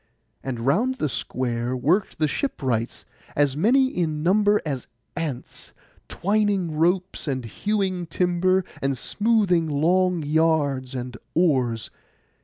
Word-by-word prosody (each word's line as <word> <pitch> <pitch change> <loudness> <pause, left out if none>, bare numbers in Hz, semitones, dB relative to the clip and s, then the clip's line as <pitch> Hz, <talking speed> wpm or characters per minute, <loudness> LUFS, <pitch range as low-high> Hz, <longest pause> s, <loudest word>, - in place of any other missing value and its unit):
And 125 -3 -4
round 205 - +2
the 195 - -1
square 125 -2 -2
worked 175 +10 +1
the 155 - +2
ship 265 - -3
wrights, 115 -3 -2 0.3
as 145 -2 +2
many 245 - +4
in 155 -8 -2
number 205 +3 +4
as 135 -5 -4 0.3
ants, 155 -7 -5 0.3
twining 200 -3 0
ropes, 180 +3 0
and 130 -4 -2
hewing 190 - -2
timber, 180 +2 +1 0.2
and 135 -1 0
smoothing 205 - +1
long 175 +3 +2
yards 145 -4 +1
and 125 -1 -5 0.2
oars. 130 -10 +1
160 Hz, 120 wpm, -24 LUFS, 135-185 Hz, 0.3 s, many